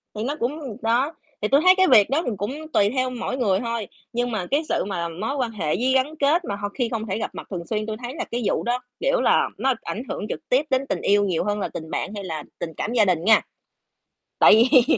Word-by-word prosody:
thì 215 - -3
nó 280 +4 -2
cũng 260 -2 -3
đó, 245 +7 +1 0.3
thì 210 - +1
tui 275 +5 +4
thấy 370 +2 +7
cái 375 -1 +5
việc 210 +1 +6
đó 290 +4 +2
thì 245 - -1
cũng 205 +6 -3 0.2
tùy 200 0 +4
theo 255 +1 0
mỗi 255 +1 -4
người 200 -6 +2
thôi, 230 -4 -3 0.3
nhưng 245 +1 -1
mà 190 -5 -2
cái 285 - +3
sự - - 0
mà 170 -4 -2
mối 215 - -3
quan 250 -5 -1
hệ 190 -8 -5
với 250 +7 +1
gắn 280 +4 +1
kết 310 +5 +2
mà 200 - -3
ho 205 0 -4
khi 240 +3 -2
không 225 -1 -3
thể 190 - -2
gặp 220 - -3
mặt - - -8
thường 170 -2 -4
xuyên, 215 -1 -2
tui 215 0 -4
thấy 250 +5 -5
là - - -3
cái 240 - -1
vụ - - 0
đó, 245 +1 0 0.2
kiểu - - +1
là, - - +3
nó 265 0 +2
ảnh 235 - -5
hưởng - - -3
trực - - -6
tiếp 270 +5 +3
đến 265 0 +1
tình - - -1
yêu 205 0 +3
nhiều 180 -5 0
hơn 205 0 -1
là - - -1
tình 160 -1 -8
bạn - - -3
hay 200 - -5
là 160 -4 -5 0.2
tình 165 -2 -4
cảm 230 - -2
gia 220 -4 +4
đình 175 -3 +1
nha. 220 +1 +6 1.0
Tại - - +7 0.2
vì 255 -5 +7
230 Hz, 270 wpm, -23 LUFS, 205-260 Hz, 1.0 s, thấy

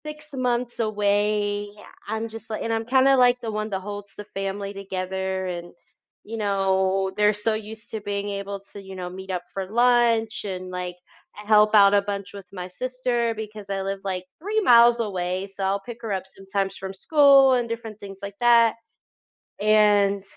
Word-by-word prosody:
6 300 0 -8
months 245 -2 -1
away. 205 -1 0 0.4
I'm 220 +2 -2
just 225 0 -10
like 215 - -3
and 225 - -1
I'm 225 0 -1
kinda, 265 +2 +4
like, 250 0 +4
the 225 -2 -4
one 215 0 -3
that 190 -2 -2
holds 205 0 -8
the 210 - -7
family 195 0 -4
together 190 -1 -3
and, 175 -1 -6 0.5
you 225 +2 -7
know, 195 -2 +1
they're 210 0 +4
so 210 +2 0
used 215 0 -7
to 220 - -4
being 205 0 -3
able 200 0 -5
to, 200 - -8
you 190 0 -10
know, 180 -1 -5
meet 190 +1 -8
up 180 -1 -3
for 195 -1 -3
lunch 235 -1 +2
and, 185 -2 -5
like, 180 -1 -4 0.4
help 210 0 +3
out 200 -1 +7
a 200 - +5
bunch 200 0 -5
with 200 -2 -9
my 180 -2 -6
sister 245 +2 -1
because 215 -2 -8
I 195 -1 -2
live, 195 0 -3
like, 185 -2 -3
3 420 +6 0
miles 240 - +6
away, 185 -3 -2
so 195 0 -7
I'll 195 +1 +1
pick 235 +3 -9
her 225 -3 -4
up 190 - -2
sometimes 195 0 -3
from 190 0 -6
school 275 +3 +5
and 240 -2 0
different 225 -2 -6
things 195 -1 -10
like 200 0 -7
that, 235 -2 +5 0.8
and 205 -2 +4
205 Hz, 185 wpm, -24 LUFS, 195-230 Hz, 0.8 s, out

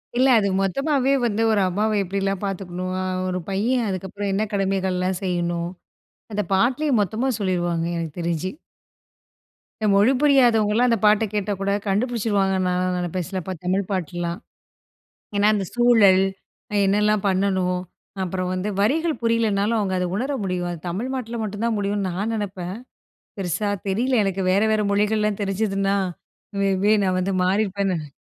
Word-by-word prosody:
இல்ல. 255 +2 +4
அது 200 - +1
மொத்தமாவே 275 - +1
வந்து 225 -1 0
ஒரு 210 -2 +3
அம்மாவ 210 +3 0
எப்பிடிலாம் 195 +1 -2
பார்த்துக்கணும்? 185 -1 -4 0.4
ஒரு 185 0 -2
பையன் 225 +5 +1
அதுக்கப்புறம் 195 +2 -3
என்ன 200 +2 +1
கடமைகள்லாம் 190 -2 0
செய்யணும்? 175 -2 -1 0.6
அந்த 210 0 0
பாட்டுலே 250 +10 +2
மொத்தமா 220 +6 -1
சொல்லிருவாங்க 175 -4 0
எனக்கு 165 -3 -4
தெரிஞ்சு. 170 +2 -2 1.3
இந்த 215 - +2
மொழி 205 +6 +5
புரியாதவங்கலாம் 240 -5 +4
அந்த 230 - +3
பாட்ட 210 +1 +5
கேட்டா 205 0 -1
கூட 195 0 0 0.2
கண்டுபிடிச்சுடுவாங்க 205 -2 +1
நான்லாம் 180 0 0
நினைப்பேன். 175 0 -3
சிலப்ப 190 -1 -4
தமிழ் 190 +2 +1
பாட்டுலாம். 175 -1 -3 1.0
ஏன்னா 205 +1 +3
அந்த 200 -2 -1
சூழல். 225 -6 +5 0.6
என்னலாம் 210 +1 +2
பண்ணணும்? 185 -1 +1 0.4
அப்புறம் 185 0 -2
வந்து 185 +3 -2
வரிகள் 310 +10 +2
புரியலனாலும், 225 -1 +1
அவுங்க 190 -3 -1
அத 180 - 0
உணர 260 +7 -1
முடியும். 180 -2 -2
அது 170 - -6
தமிழ்நாட்டுல 235 +4 -3
மட்டும் 210 +1 -4
தான் 230 -1 +1
முடியும்னு 200 -1 -1
நான் 205 +6 -2
நினைப்பேன். 190 -3 -4 0.6
பெருசா 195 +3 -1 0.2
தெரியல 240 +5 +1
எனக்கு. 195 -1 -1
வேற 195 +2 +3
வேற 215 -1 +2
மொழிகள்லாம் 210 0 +1
தெரிஞ்சிதுன்னா, 195 0 0 0.7
மே 195 0 +2
பி 210 - +5
நான் 185 -1 +1
வந்து 195 +2 -1
மாறியிருப்பேன்னு 195 0 +1
நினை 150 -2 -7
195 Hz, 140 wpm, -23 LUFS, 185-215 Hz, 1.3 s, மொழி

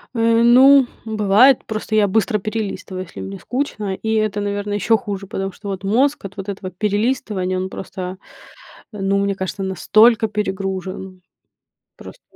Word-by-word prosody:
Э, 230 0 +3
ну, 260 +2 +7 0.2
бывает, 220 +4 +4
просто 215 0 -5
я 210 -1 +4
быстро 215 +2 +1
перелистываю, 200 -3 -4
если 170 - -10
мне 95 +1 -7
скучно, 225 -6 -3
и 220 +3 -3
это, 215 -1 0
наверно, 205 0 -3
еще 210 +2 +2
хуже, 200 -2 -6
потому 195 0 -4
что 200 +3 -11
вот 195 0 -5
мозг 245 +6 +1
от 195 - -8
вот 195 +1 -6
этого 190 -1 -6
перелистывания- 205 -2 -1
он 185 +1 -3
просто, 190 -1 -7 0.7
ну, 200 -2 0
мне 200 0 0
кажется, 190 +1 -4
настолько 215 +5 +4
перегружен- 190 -2 -4 0.8
просто - - -12
205 Hz, 150 wpm, -20 LUFS, 190-220 Hz, 0.8 s, ну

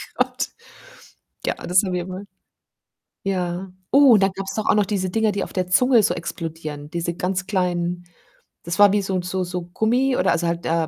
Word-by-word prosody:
Gott. - - -1 1.0
Ja, - - +1
das 180 +1 +2
sind 185 -3 0
wir 180 0 -2
wohl. 185 +2 -7 1.0
Ja. 185 -1 -2 0.2
Oh, 275 -1 +7
und 200 - +4
dann 195 0 +3
gab 195 0 -6
's 195 - -5
doch 215 - -2
auch - - +5
noch 205 -2 +2
diese 185 -3 -1
Dinger, 220 +1 +1
die 200 - -2
auf - - -11
der 185 -1 -1
Zunge 245 +3 +5
so - - +2
explodieren. 155 -3 -6
Diese 170 0 -2
ganz 185 +1 -2
kleinen 175 -3 -1 0.6
das 170 +3 -3
war 205 -1 +7
wie 205 -1 +2
so 190 -1 -2
'n 180 - -1
so 185 +1 -2
so 180 0 -4
Gummi 245 +8 +1
oder - - +2
also 170 0 0
halt, 170 0 -2
äh 165 -1 +1
185 Hz, 210 wpm, -22 LUFS, 175-200 Hz, 1.0 s, Oh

